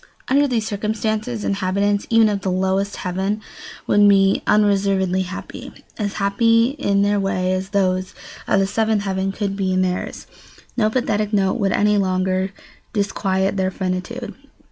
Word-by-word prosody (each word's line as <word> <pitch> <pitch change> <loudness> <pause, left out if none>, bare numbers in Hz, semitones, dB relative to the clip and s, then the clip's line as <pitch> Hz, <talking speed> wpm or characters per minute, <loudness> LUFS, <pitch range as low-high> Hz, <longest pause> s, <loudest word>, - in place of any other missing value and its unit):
Under 285 +2 +4
these 230 -5 -1
circumstances, 215 +2 -2
inhabitants 200 +1 0
even 225 -1 +5
of 205 -2 -1
the 190 - -2
lowest 190 +2 0
heaven 190 +3 -2 0.5
would 205 0 +5
be 195 -1 +4
unreservedly 195 -3 +2
happy, 185 +1 -7 0.3
as 205 -2 -2
happy 230 +4 +2
in 200 0 +2
their 205 0 +2
way 185 -1 0
as 190 +1 -3
those 185 -2 0 0.3
of 200 - +3
the 195 - +2
seventh 215 +1 0
heaven 190 0 -1
could 195 -1 -3
be 190 -2 -1
in 185 0 +2
theirs. 180 0 -3 0.5
No 215 -3 +2
pathetic 215 -3 -1
note 195 +2 +1
would 195 -2 +1
any 210 +1 +2
longer 185 0 0 0.4
disquiet 195 -2 0
their 190 0 +1
finitude. 190 +6 -4
200 Hz, 150 wpm, -20 LUFS, 190-210 Hz, 0.5 s, even